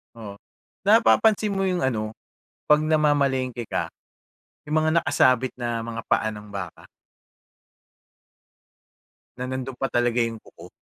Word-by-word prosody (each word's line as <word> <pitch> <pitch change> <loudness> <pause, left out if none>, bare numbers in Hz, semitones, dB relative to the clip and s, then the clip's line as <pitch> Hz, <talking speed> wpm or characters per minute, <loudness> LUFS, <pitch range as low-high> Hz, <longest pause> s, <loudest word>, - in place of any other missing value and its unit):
Oo. 105 -3 -9 0.5
Napapansin 215 0 +4
mo 195 0 0
yung 180 -2 0
ano, 110 -4 -1 0.6
'pag 150 0 +6
namamalengke 140 -5 +1
ka, - - -3 0.8
yung 155 +1 +1
mga 155 +1 +2
nakasabit 130 -3 +2
na 120 -2 -4
mga 115 -1 -5
paa 110 - +2
ng 105 0 -10
baka 95 -4 -8 2.5
na 125 - -5
nando'n 130 0 -5
pa 135 - -2
talaga 120 0 +1
yung 115 -1 -2
kuko? - - -15
130 Hz, 120 wpm, -24 LUFS, 115-150 Hz, 2.5 s, pag